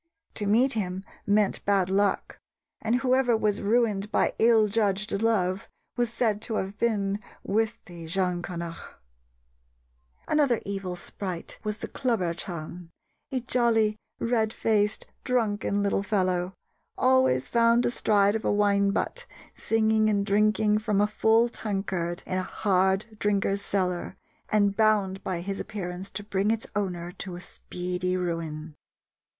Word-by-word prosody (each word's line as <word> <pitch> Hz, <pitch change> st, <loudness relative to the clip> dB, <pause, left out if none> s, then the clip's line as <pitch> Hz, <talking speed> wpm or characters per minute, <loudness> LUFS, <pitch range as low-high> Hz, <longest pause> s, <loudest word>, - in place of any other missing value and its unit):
To 205 Hz, -, -3 dB
meet 245 Hz, +6 st, +4 dB
him 190 Hz, -3 st, -3 dB, 0.2 s
meant 205 Hz, -1 st, +2 dB
bad 195 Hz, -2 st, +2 dB
luck, 195 Hz, +1 st, 0 dB, 0.4 s
and 225 Hz, +2 st, +1 dB
whoever 255 Hz, -2 st, +3 dB
was 210 Hz, -1 st, 0 dB
ruined 210 Hz, -2 st, +1 dB
by -, -, +2 dB
ill 225 Hz, -2 st, +5 dB
judged 210 Hz, 0 st, 0 dB
love 195 Hz, -4 st, +1 dB, 0.3 s
was 240 Hz, -2 st, 0 dB
said 225 Hz, -3 st, 0 dB
to 220 Hz, -, -3 dB
have 195 Hz, 0 st, -2 dB
been 205 Hz, -3 st, 0 dB, 0.2 s
with 225 Hz, +3 st, 0 dB
the 170 Hz, -4 st, -10 dB
Geancanach. 175 Hz, -1 st, -3 dB, 1.3 s
Another 285 Hz, -6 st, +3 dB
evil 195 Hz, -2 st, -4 dB
sprite 180 Hz, 0 st, -6 dB
was 210 Hz, 0 st, -2 dB
the -, -, -5 dB
Clobher 220 Hz, -10 st, -1 dB
ceann, 170 Hz, 0 st, -6 dB, 0.4 s
"a 260 Hz, -2 st, -1 dB
jolly, 230 Hz, -3 st, +2 dB, 0.2 s
red 225 Hz, -2 st, +1 dB
faced, 210 Hz, -1 st, +1 dB, 0.2 s
drunken 205 Hz, -5 st, 0 dB
little 200 Hz, -1 st, +1 dB
fellow," 185 Hz, -3 st, 0 dB, 0.4 s
always 255 Hz, -, +3 dB
"found 235 Hz, +1 st, +3 dB
astride 205 Hz, -4 st, +3 dB
of 220 Hz, -, -2 dB
a -, -, +1 dB
wine 200 Hz, -1 st, +3 dB
butt" -, -, -2 dB, 0.3 s
singing 220 Hz, -1 st, +2 dB
and 200 Hz, -1 st, +1 dB
drinking 210 Hz, +1 st, +3 dB
from 210 Hz, -2 st, 0 dB
a 205 Hz, -, +5 dB
full 220 Hz, +2 st, +3 dB
tankard 195 Hz, -6 st, -3 dB
in 185 Hz, -, -1 dB
a -, -, 0 dB
hard 190 Hz, 0 st, +1 dB
drinker's 200 Hz, -1 st, +1 dB
cellar, 185 Hz, -2 st, -2 dB, 0.3 s
and 205 Hz, -2 st, +3 dB
bound 205 Hz, -3 st, +2 dB
by 180 Hz, -2 st, -2 dB
his 195 Hz, +2 st, -4 dB
appearance 190 Hz, -2 st, -5 dB
to 205 Hz, +2 st, -5 dB
bring 200 Hz, 0 st, 0 dB
its 225 Hz, 0 st, 0 dB
owner 180 Hz, -4 st, -2 dB
to 180 Hz, -1 st, -7 dB
speedy 180 Hz, 0 st, -3 dB
ruin. 165 Hz, -3 st, -4 dB
205 Hz, 135 wpm, -27 LUFS, 185-220 Hz, 1.3 s, ill